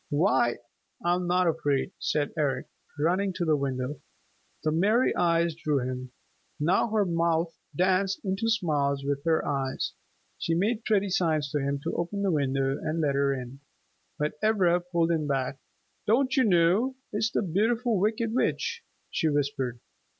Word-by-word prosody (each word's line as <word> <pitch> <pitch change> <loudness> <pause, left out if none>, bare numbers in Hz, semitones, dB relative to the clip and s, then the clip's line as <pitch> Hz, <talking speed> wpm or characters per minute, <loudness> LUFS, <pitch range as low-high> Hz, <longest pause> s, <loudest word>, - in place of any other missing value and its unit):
"Why, 145 -6 +2 0.5
I'm 175 +1 +1
not 180 +1 +3
afraid," 145 -4 0
said 145 -1 0
Eric, 140 -4 0 0.3
running 185 +6 +1
to 175 -1 -2
the 155 -2 +3
window. 135 0 -3 0.6
The 155 - +1
merry 210 +10 +3
eyes 170 -1 +2
drew 155 -2 -1
him. 130 0 -4 0.5
Now 165 +9 +2
her 210 -2 +2
mouth 165 -1 0 0.2
danced 190 +3 +2
into 195 +4 0
smiles 145 -10 +1
with 140 0 -1
her 160 -1 +2
eyes. 135 -2 -2 0.5
She 165 - 0
made 215 +6 0
pretty 205 -3 +2
signs 155 -6 +1
to 150 - 0
him 140 0 -1
to - - -2
open 200 +4 -2
the 195 - +2
window 135 -2 0
and 155 +2 -2
let 145 -3 +1
her 140 0 +2
in. 130 0 -5 0.6
But 150 0 -2
Ivra 190 -5 +3
pulled 170 -1 +2
him 155 -3 0
back. 135 -1 -1 0.5
"Don't 255 +6 +3
you 260 -3 +4
know? 190 +7 +3 0.2
It's 220 +2 +1
the - - 0
Beautiful 220 +5 +1
Wicked 220 +3 0
Witch!" 470 - 0 0.3
she 160 - +1
whispered. 135 -4 -1
165 Hz, 155 wpm, -27 LUFS, 140-195 Hz, 0.6 s, you